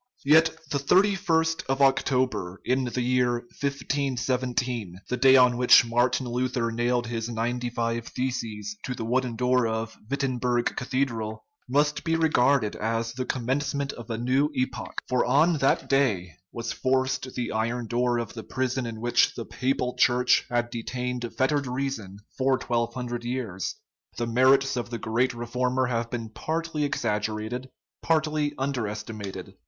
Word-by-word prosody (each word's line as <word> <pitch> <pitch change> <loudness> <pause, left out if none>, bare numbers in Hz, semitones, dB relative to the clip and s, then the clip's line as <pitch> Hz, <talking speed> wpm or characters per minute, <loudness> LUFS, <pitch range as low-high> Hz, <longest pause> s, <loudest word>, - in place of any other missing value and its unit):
Yet 160 +3 +6 0.2
the 140 - +1
3ist 165 -1 +2
of 135 +1 0
October 130 -8 +1
in 130 +1 +1
the 125 0 -2
year 125 0 +2 0.3
1517, 130 -6 -1
the 125 - 0
day 130 +1 +6
on 125 -2 +6
which 125 -1 +7
Martin 120 +2 +1
Luther 125 -1 -1
nailed 120 +1 0
his 115 -1 -3
ninety 120 +1 -2
five 115 0 -2
theses 110 -5 -3
to 125 - -3
the 115 - -4
wooden 125 0 0
door 125 0 +2
of 110 0 -3
Wittenburg 125 -3 0
Cathedral, 115 -4 -2 0.2
must 145 +3 +1
be 165 -1 +1
regarded 140 -7 +3
as 115 +1 -1
the 130 +1 -3
commencement 135 +3 -1
of 120 0 -10
a 115 - -2
new 130 +5 +2
epoch; 130 0 -3
for 125 -1 +2
on 150 +5 +3
that 135 - +2
day 105 -11 +1 0.2
was 115 0 -4
forced 130 0 0
the 120 -2 -2
iron 115 +2 -1
door 120 +1 +1
of 115 -1 -4
the 115 - -6
prison 130 +1 -2
in 110 -1 -6
which 120 0 +3
the - - -5
Papal 130 -1 -1
Church 125 -1 +4
had 120 0 0
detained 125 +1 -4
fettered 140 +1 +1
reason 125 -7 -3 0.2
for 130 0 +3
twelve 120 -2 -1
hundred 120 -1 -4
years. 120 -7 -3 0.4
The 120 - -1
merits 130 +3 +4
of 120 -1 -3
the 120 - -3
great 120 +3 0
re 120 0 -5
former 125 +2 0
have 115 -1 -1
been 115 -2 -4
partly 160 +4 -2
exaggerated, 110 0 -2 0.3
partly 155 -2 +1
underesti 110 -5 -3
mated. 100 -2 -7
125 Hz, 155 wpm, -26 LUFS, 115-135 Hz, 0.4 s, which